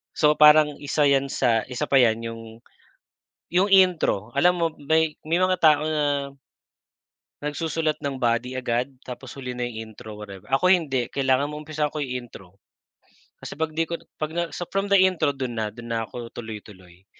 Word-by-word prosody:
So, 150 -1 +4
parang 150 -1 +7
1 145 +1 0
yan 140 -1 +2
sa 115 -4 +2
1 125 -2 -4
pa 135 - +4
yan 115 -2 +3
yung, 115 0 -6 1.1
yung 180 +4 +3
intro 180 - +3
alam 180 +5 +4
mo 170 - +2
may, 160 +2 +1
may 165 +2 +1
mga 185 0 +3
tao 150 -2 +5
na 145 -3 -1 1.1
nagsusulat 155 +1 -2
ng 135 -2 -3
body 120 +1 0
agad 125 +1 -2
tapos 125 0 -9
huli 125 -2 -6
na 125 - -1
'yong 110 -2 -7
intro, 110 0 -10
whatever. 100 -3 -10
Ako 180 +7 +3
hindi, 140 -10 +2
kailangan 135 +1 +1
maumpisahan 150 0 -3
ko 155 - -8
yung 125 -4 -4
intro. 95 0 -15 0.8
Kasi - - -8
'pag 160 +1 -2
'di 165 +1 -1
ko 170 - -4 0.2
'pag 155 0 -3
na 175 - 0
so 175 - -5
from 195 +1 0
the 200 - +6
intro 185 -5 +3
do'n 130 -3 -4
na, 110 -1 -1
do'n 115 +2 -11
na 115 - -1
ako 115 +1 -8
tuloy-tuloy 100 -5 -10
140 Hz, 180 wpm, -24 LUFS, 120-155 Hz, 1.1 s, parang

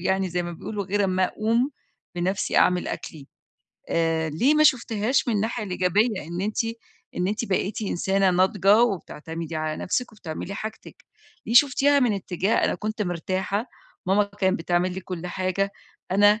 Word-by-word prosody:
يعني 190 +1 0
زي 175 +1 -1
ما 175 0 -5
بيقولوا 200 +4 -5
غير 200 +2 0
أمّا 185 0 +2
أقوم 230 +7 0 0.4
بنفسي 185 +3 -1
أعمل 180 0 +3
أكلي 145 -4 -7 0.6
آآ، 165 -1 +1
ليه 245 - +2
ما 305 - +4
شُفتيهاش 240 -2 +2
من 225 - +1
الناحية 220 +2 -1
الإيجابية، 190 +3 +1
إن 175 +2 -4
أنتِ 215 +3 -1 0.5
إن 180 - 0
أنتِ 215 +3 -1
بقيتِ 200 +1 -1
إنسانة 195 0 +1
ناضجة 195 +4 +4
وبتعتمدي 165 -6 -3
على 155 0 -2
نفسِك 245 +5 -2
وبتعملي 195 -1 -6
حاجتِك، 220 +1 -8 0.4
ليه 230 - -2
شُفتيها 285 +2 +5
من 245 -5 +3
اتجاه 190 +1 -1
أنا - - +1
كنت 215 0 -3
مرتاحة، 190 +5 -2 0.4
ماما 200 +2 +3
كان 200 -2 0
بتعمل 175 +2 0
لي 190 - -4
كُلّ 180 -1 -6
حاجة 190 +2 -1 0.4
أنا 205 +3 +5
195 Hz, 155 wpm, -25 LUFS, 180-215 Hz, 0.6 s, شُفتيها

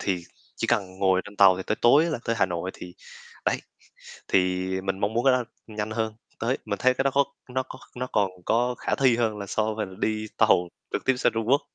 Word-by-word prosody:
thì 90 -3 -1 0.3
chỉ - - -1
cần 95 -1 0
ngồi 95 -1 +3
trên 105 0 -12
tàu 95 -2 +7
thì 95 - -4
tới 105 - 0
tối 140 +7 +6
á 170 - -1
là 150 - -2
tới 115 - 0
Hà - - +4
Nội, 90 +1 -3
thì 90 0 -10 0.5
đấy, - - +2 0.7
thì 90 0 +2
mình 95 0 -2
mong 105 +2 0
muốn 120 - +1
cái 135 - +6
đó 125 -1 +1 0.2
nhanh 105 -1 -4
hơn, 110 -1 -2 0.2
tới 120 +4 0
mình 100 -2 -3
thấy 130 0 +3
cái 130 - 0
đó 135 - +3
có 140 0 +5 0.2
nó 130 +1 -1
có 130 0 -11 0.2
nó 125 - -2
còn 100 -3 +2 0.2
có 120 +2 +2
khả - - -1
thi 130 -4 +3
hơn 110 -3 0
là 100 - -5
so 110 +2 0
với 105 -1 -2
là 95 - -12
đi 110 0 -1
tàu 90 0 +4 0.2
trực - - -2
tiếp 130 - +3
sang - - +2
Trung 115 -1 -1
Quốc. 140 +3 +5
110 Hz, 250 wpm, -26 LUFS, 95-125 Hz, 0.7 s, tàu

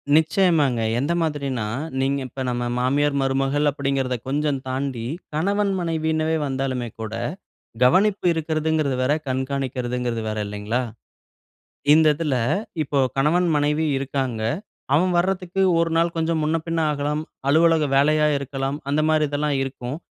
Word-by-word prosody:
நிச்சயமாங்க. 155 -6 +3 0.2
எந்த 145 +6 0
மாதிரின்னா, 140 -7 -2 0.4
நீங்க 135 +1 +1
இப்ப 130 +1 -6
நம்ம 120 0 -2 0.2
மாமியார் 140 +3 +1
மருமகள் 135 +2 +1
அப்பிடீங்கறத 135 -2 -1
கொஞ்சம் 145 0 0
தாண்டி, 130 -3 -3 0.3
கணவன், 200 +6 +1
மனைவின்னுவே 160 -1 0
வந்தாலுமே 130 -3 -2
கூட, 110 0 -5 0.7
கவனிப்பு 190 +10 +4
இருக்கிறதுங்கிறது 155 -3 0
வேற, 135 +3 +2
கண்காணிக்கிறதுங்கிறது 125 -3 -2
வேற, 110 - -3
இல்லைங்களா! 105 +4 -2 1.1
இந்த 160 0 +5
இதில 150 -3 -1 0.5
இப்போ 140 -1 -1 0.2
கணவன் 170 +6 +3
மனைவி 150 +2 +1
இருக்காங்க, 130 -4 -2 0.5
அவன் 180 +5 +3
வர்றதுக்கு 185 +1 0 0.2
1 165 -1 +1
நாள் 170 0 +1
கொஞ்சம் 160 -1 0
முன்ன 155 +2 +1
பின்ன 165 0 0
ஆகலாம், 150 +1 -1 0.3
அலுவலக 165 +1 +4
வேலையா 150 +2 +4
இருக்கலாம், 135 0 -3
அந்தமாரி 155 +1 +2
இதெல்லாம் 145 -1 0
இருக்கும். 135 +1 -5
145 Hz, 120 wpm, -23 LUFS, 130-160 Hz, 1.1 s, இந்த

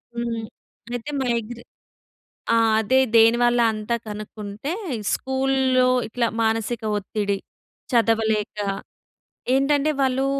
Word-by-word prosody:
హ్మ్. 235 -1 -3 0.5
అయితే 245 +5 -5
మైగ్రే 235 -1 -2 0.9
ఆ! - - +5 0.3
అదే 240 +5 +2 0.2
దేనివల్ల 240 +2 +5
అంతా 215 +2 -2
కనుక్కుంటే 210 +4 -6 0.4
స్కూల్‌లో 265 -1 +1 0.2
ఇట్లా 235 +1 0 0.2
మానసిక 225 +1 -1
ఒత్తిడి, 205 0 -2 0.5
చదవలేక. 225 -3 +1 1.0
ఏంటంటే 285 +2 +2
వాళ్ళు 265 0 +1
235 Hz, 85 wpm, -23 LUFS, 220-260 Hz, 1.0 s, ఆ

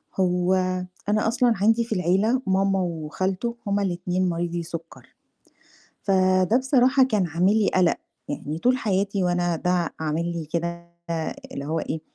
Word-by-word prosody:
هو، 180 0 +2 0.6
أنا 215 +1 +2
أصلًا 235 +1 +3
عَندي 225 +2 +4
في 225 -2 -3
العيلة 195 +8 +2
ماما 195 0 +2
وخالتو 185 +6 -2
هُم 200 0 +1
الاتنين 180 -1 -1
مريضي 170 0 -2
سُكَّر. 165 0 -9 0.9
فده 185 +1 +3
بصراحة 260 0 +4
كان 215 -8 +1
عامل 175 +5 +2
لي 205 - +2
قلق، 180 -2 +3 0.3
يعني 155 +2 -4
طول 250 +7 +3
حياتي 200 -3 0
وأنا 175 -1 +1
ده 180 0 0
عامل 160 +2 -1
لي 170 -2 -4
كده 170 +2 -4 0.6
اللي 140 - -5
هو 160 +2 -1
إيه 160 - -4
185 Hz, 145 wpm, -24 LUFS, 170-205 Hz, 0.9 s, عَندي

